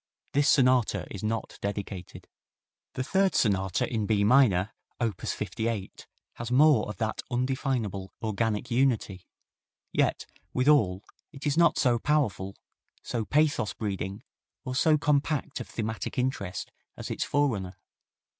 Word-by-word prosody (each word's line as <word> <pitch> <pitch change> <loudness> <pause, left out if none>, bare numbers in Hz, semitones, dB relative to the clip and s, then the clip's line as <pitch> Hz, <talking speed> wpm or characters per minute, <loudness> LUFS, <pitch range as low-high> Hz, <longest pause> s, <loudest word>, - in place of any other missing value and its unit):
This 145 0 +3
sonata 130 -5 +3
is 100 - -6
not 110 +1 -3
dedicated. 100 -3 -5 0.7
The 130 - -1
third 190 +6 +2
Sonata 95 -4 +1
in 110 -4 -2
B 105 -1 +2
minor, 110 -5 +4 0.3
op. 115 -6 -1
58, 110 -3 -3 0.3
has 115 - -5
more 135 -2 +5
of 105 - -6
that 110 +1 -2
undefinable 120 -6 -1
"organic 110 -1 -1
unity," 115 -7 0 0.7
yet, - - +1 0.3
withal, 125 -9 +3 0.3
it 140 +2 -10
is 145 -1 +1
not 170 +1 +4
so 120 -3 +3
powerful, 115 -10 0 0.5
so 115 -3 -2
pathos 145 -6 +1
breeding 100 -2 -4 0.4
or 130 - -3
so 155 +4 +4
compact 150 0 0
of - - -6
thematic 110 +2 -4
interest 105 -8 -2 0.3
as - - -6
its - - -1
forerunner. 105 -11 0
115 Hz, 125 wpm, -28 LUFS, 100-135 Hz, 0.7 s, more